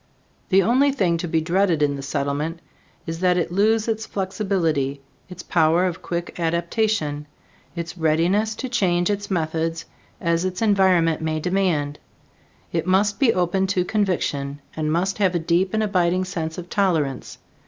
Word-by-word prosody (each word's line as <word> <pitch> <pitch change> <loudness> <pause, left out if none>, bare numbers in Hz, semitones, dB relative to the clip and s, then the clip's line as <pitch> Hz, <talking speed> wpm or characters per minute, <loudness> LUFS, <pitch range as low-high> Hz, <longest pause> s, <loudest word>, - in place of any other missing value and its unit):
The 195 0 +5
only 265 +5 +3
thing 185 -11 +1
to 175 +1 -4
be 160 0 +1
dreaded 170 -1 +1
in 145 -1 +1
the 140 - -6
Settlement 145 +4 -2 0.5
is 165 0 -5
that 180 0 +3
it 170 - -1
lose 215 +4 +2
its 220 -1 -2
flexibility, 185 -8 -1 0.3
its 180 -1 -9
power 165 +2 +3
of 180 -2 -3
quick 175 0 -5
adaptation, 170 -2 -1 0.5
its 170 0 -5
readiness 175 +8 +2
to 260 - -4
change 185 -7 +1
its 205 0 -3
methods 165 -2 -1 0.3
as 170 0 0
its 185 0 -2
environment 190 -7 +3
may 160 0 -1
demand. 165 -5 0 0.7
It 165 0 -2
must 200 +2 +2
be 265 -5 +5
open 185 +1 +1
to 185 -2 0
conviction 155 -9 -1 0.2
and 155 -1 -1
must 185 +5 0
have 190 -3 +2
a - - +4
deep 175 +3 +1
and 220 0 0
abiding 185 -2 +1
sense 160 -3 -4
of 180 -1 -7
tolerance. 160 -10 -1
175 Hz, 160 wpm, -22 LUFS, 160-195 Hz, 0.7 s, The